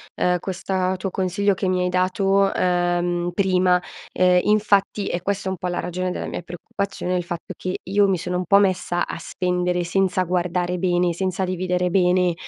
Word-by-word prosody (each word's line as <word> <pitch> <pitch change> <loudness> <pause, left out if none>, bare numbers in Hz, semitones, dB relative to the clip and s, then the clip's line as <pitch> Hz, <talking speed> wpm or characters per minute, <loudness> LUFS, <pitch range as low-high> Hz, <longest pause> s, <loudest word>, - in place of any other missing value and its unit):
uhm, 180 0 +1
questa 185 0 -2
tuo 190 +1 -3
consiglio 195 +2 +1
che 185 0 -2
mi 185 0 +1
hai 180 - 0
dato, 195 +2 +2
uhm, 175 -1 0
prima. 185 -2 +2 0.3
Ehm, 180 0 +4
infatti, 205 -1 +2
è 175 - -2
questa 195 0 -2
un 190 - -2
po' 180 - -4
la 175 - -2
ragione 180 +1 -3
della - - -4
mia - - -5
preoccupazione, 180 +2 -4
il 180 - 0
fatto 170 -1 -6
che 185 0 -4
io 200 +2 +2
mi 185 - +2
sono 180 +1 -4
un 180 - -2
po' 200 - +5
messa 185 -3 +1
a - - -6
spendere 180 +1 -1
senza 185 +1 +1
guardare 180 0 -1
bene, 175 -1 +1
senza 185 +1 -1
dividere 180 0 -1
bene, 180 -1 +3
180 Hz, 185 wpm, -22 LUFS, 180-190 Hz, 0.3 s, po